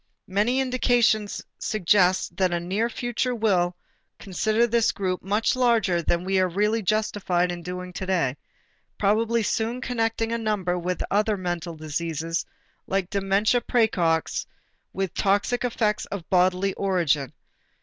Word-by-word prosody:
Many 210 Hz, +7 st, +1 dB
indications 245 Hz, -5 st, +1 dB, 0.2 s
suggest 185 Hz, -2 st, +2 dB
that 185 Hz, -2 st, +2 dB
a 175 Hz, -, 0 dB
near 195 Hz, +7 st, -1 dB
future 240 Hz, +1 st, -2 dB
will 185 Hz, -6 st, +1 dB, 0.4 s
consider 215 Hz, +4 st, +1 dB
this 235 Hz, -1 st, +2 dB
group 185 Hz, -2 st, -2 dB
much 205 Hz, +6 st, +1 dB
larger 225 Hz, -8 st, +2 dB
than 170 Hz, +1 st, 0 dB
we 190 Hz, +1 st, +1 dB
are 185 Hz, 0 st, +2 dB
really 210 Hz, +5 st, +1 dB
justified 190 Hz, -3 st, 0 dB
in 175 Hz, 0 st, -6 dB
doing 180 Hz, +1 st, -6 dB
today, 180 Hz, -9 st, 0 dB, 0.6 s
probably 225 Hz, +3 st, +2 dB
soon 230 Hz, +3 st, -1 dB
connecting 225 Hz, -2 st, -1 dB
a 230 Hz, -, -1 dB
number 210 Hz, -5 st, -1 dB
of 180 Hz, 0 st, -2 dB
other 210 Hz, +1 st, +2 dB
mental 175 Hz, -2 st, -4 dB
diseases 160 Hz, +1 st, -3 dB, 0.4 s
like 190 Hz, -2 st, -1 dB
dementia 200 Hz, +4 st, +2 dB
præcox 180 Hz, -10 st, +1 dB, 0.4 s
with 190 Hz, -2 st, -3 dB
toxic 205 Hz, +6 st, +1 dB
effects 220 Hz, -3 st, 0 dB
of 195 Hz, -4 st, -6 dB
bodily 185 Hz, +1 st, +3 dB
origin. 165 Hz, -8 st, 0 dB
195 Hz, 130 wpm, -25 LUFS, 180-225 Hz, 0.6 s, bodily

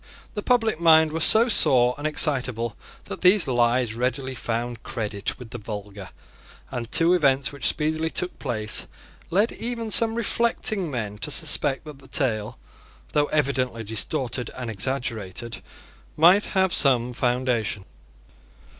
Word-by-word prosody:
The 210 Hz, -, -4 dB
public 225 Hz, -6 st, +1 dB
mind 160 Hz, -2 st, +5 dB
was 160 Hz, +1 st, 0 dB
so 225 Hz, +2 st, +6 dB
sore 125 Hz, -, +4 dB
and 145 Hz, +2 st, -3 dB
excitable 125 Hz, -7 st, 0 dB, 0.3 s
that 95 Hz, -, -8 dB
these 185 Hz, 0 st, +5 dB
lies 120 Hz, -2 st, +1 dB
readily 130 Hz, +3 st, -2 dB
found 120 Hz, -1 st, -4 dB
credit 105 Hz, -4 st, -4 dB
with 125 Hz, -3 st, -12 dB
the 120 Hz, -, -6 dB
vulgar; 105 Hz, -2 st, -8 dB, 0.6 s
and 120 Hz, -1 st, -5 dB
two 170 Hz, +2 st, +3 dB
events 135 Hz, -7 st, +2 dB
which 140 Hz, -4 st, -3 dB
speedily 155 Hz, +1 st, -1 dB
took 180 Hz, +2 st, -2 dB
place 110 Hz, -6 st, -2 dB, 0.4 s
led 205 Hz, +7 st, +1 dB
even 230 Hz, -2 st, -5 dB
some 225 Hz, +1 st, +5 dB
reflecting 220 Hz, -5 st, 0 dB
men 105 Hz, -6 st, -5 dB
to -, -, -4 dB
suspect 145 Hz, -1 st, +1 dB
that 150 Hz, -3 st, -11 dB
the 135 Hz, -, -17 dB
tale, 110 Hz, -8 st, -1 dB, 0.5 s
though 145 Hz, -1 st, +2 dB
evidently 130 Hz, -6 st, -1 dB
distorted 120 Hz, +3 st, -3 dB
and 125 Hz, -3 st, -5 dB
exaggerated, 115 Hz, -1 st, -4 dB, 0.6 s
might 180 Hz, +6 st, +5 dB
have 190 Hz, -1 st, +3 dB
some 125 Hz, -3 st, +2 dB
foundation. 120 Hz, -5 st, -1 dB
130 Hz, 135 wpm, -24 LUFS, 115-160 Hz, 0.6 s, so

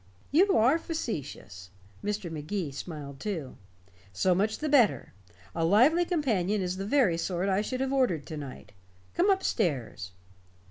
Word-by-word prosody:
"You 380 Hz, +7 st, +4 dB
are 255 Hz, +9 st, +4 dB
facetious." 140 Hz, -, -5 dB, 0.3 s
Mr. 205 Hz, -4 st, -3 dB
Magee 160 Hz, +1 st, -3 dB
smiled 140 Hz, -2 st, -7 dB
too. 165 Hz, -10 st, -4 dB, 0.6 s
"So 180 Hz, -, +2 dB
much 205 Hz, +4 st, 0 dB
the 310 Hz, -, -3 dB
better. 240 Hz, -, +3 dB, 0.4 s
A 165 Hz, -, -1 dB
lively 255 Hz, -, +5 dB
companion 220 Hz, -, 0 dB
is 185 Hz, -1 st, -2 dB
the 195 Hz, +1 st, -4 dB
very 220 Hz, -11 st, +3 dB
sort 180 Hz, +2 st, -1 dB
I 195 Hz, +1 st, +2 dB
should 255 Hz, +4 st, -3 dB
have 265 Hz, 0 st, -1 dB
ordered 185 Hz, -, +1 dB
to 155 Hz, -, -7 dB
night. 135 Hz, -7 st, -9 dB, 0.4 s
Come 365 Hz, +4 st, +2 dB
up 385 Hz, -1 st, +2 dB
stairs." 135 Hz, -, -1 dB
195 Hz, 150 wpm, -28 LUFS, 160-260 Hz, 0.6 s, lively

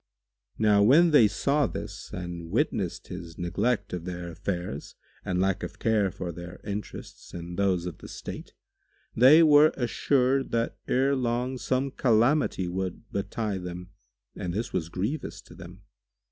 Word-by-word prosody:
Now 105 Hz, -2 st, +4 dB
when 155 Hz, +11 st, +6 dB
they 125 Hz, -8 st, +7 dB
saw 140 Hz, +7 st, +1 dB
this -, -, -7 dB
and 85 Hz, -2 st, -6 dB
witnessed -, -, -1 dB
his 85 Hz, -1 st, -8 dB
neglect 100 Hz, +8 st, -1 dB
of 90 Hz, -2 st, -3 dB
their 90 Hz, -1 st, -5 dB
affairs 85 Hz, -4 st, -5 dB, 0.3 s
and 90 Hz, -1 st, -1 dB
lack 95 Hz, 0 st, +1 dB
of -, -, -6 dB
care 110 Hz, -3 st, +2 dB
for 90 Hz, 0 st, -5 dB
their 85 Hz, +2 st, -9 dB
interests 105 Hz, -3 st, -7 dB
and 85 Hz, 0 st, -6 dB
those 95 Hz, -3 st, +1 dB
of 90 Hz, -3 st, -6 dB
the -, -, -10 dB
state, -, -, -8 dB, 0.6 s
they 140 Hz, +8 st, +8 dB
were 150 Hz, 0 st, +7 dB
assured 130 Hz, +2 st, +1 dB
that 115 Hz, 0 st, -1 dB
ere 135 Hz, +2 st, +2 dB
long 125 Hz, +1 st, -1 dB
some 130 Hz, +2 st, 0 dB
calamity 120 Hz, -4 st, +2 dB
would 95 Hz, +4 st, -4 dB
betide 100 Hz, 0 st, -3 dB
them 90 Hz, +1 st, -7 dB, 0.4 s
and 90 Hz, 0 st, -4 dB
this 110 Hz, +3 st, -3 dB
was 85 Hz, -3 st, -2 dB
grievous 105 Hz, -, -3 dB
to -, -, -16 dB
them. -, -, -12 dB
100 Hz, 150 wpm, -27 LUFS, 90-130 Hz, 0.6 s, they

